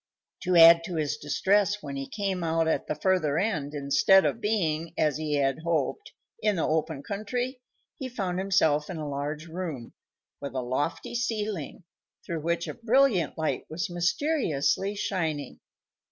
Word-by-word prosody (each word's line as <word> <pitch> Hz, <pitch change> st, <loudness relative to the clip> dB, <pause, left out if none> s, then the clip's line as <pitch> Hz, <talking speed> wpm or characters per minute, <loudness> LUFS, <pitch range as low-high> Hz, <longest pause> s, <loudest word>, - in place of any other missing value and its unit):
To 180 Hz, -1 st, 0 dB
add 165 Hz, 0 st, +9 dB
to 180 Hz, -1 st, -5 dB
his 150 Hz, -2 st, -1 dB
distress, 200 Hz, +7 st, +1 dB
when 140 Hz, -1 st, -5 dB
he 135 Hz, 0 st, -4 dB
came 195 Hz, -4 st, -2 dB
out 165 Hz, 0 st, +1 dB
at 160 Hz, -, 0 dB
the -, -, -1 dB
further 155 Hz, -3 st, +1 dB
end, 155 Hz, -8 st, -1 dB
instead 145 Hz, +7 st, +4 dB
of 230 Hz, -, -1 dB
being, 170 Hz, -6 st, -1 dB
as 150 Hz, -2 st, +2 dB
he 155 Hz, -1 st, -1 dB
had 135 Hz, 0 st, +1 dB
hoped, 165 Hz, -, -2 dB, 0.3 s
in 210 Hz, -, +2 dB
the 165 Hz, -, 0 dB
open 155 Hz, -2 st, -1 dB
country, 245 Hz, -, -3 dB, 0.4 s
he 265 Hz, -, -4 dB
found 190 Hz, -7 st, -2 dB
himself 160 Hz, -6 st, +2 dB
in 180 Hz, -, -5 dB
a 155 Hz, -1 st, -4 dB
large 145 Hz, +2 st, -4 dB
room, 160 Hz, -8 st, -6 dB, 0.5 s
with 140 Hz, -2 st, -6 dB
a 130 Hz, -, 0 dB
lofty 130 Hz, -, -2 dB
ceiling, 215 Hz, -, -3 dB, 0.4 s
through 165 Hz, -2 st, -3 dB
which 170 Hz, +2 st, -1 dB
a -, -, -4 dB
brilliant 230 Hz, -, +2 dB
light 160 Hz, -1 st, -1 dB
was 170 Hz, +2 st, -3 dB
mysteriously 180 Hz, -, 0 dB
shining. 160 Hz, -7 st, -3 dB
165 Hz, 160 wpm, -27 LUFS, 150-200 Hz, 0.5 s, add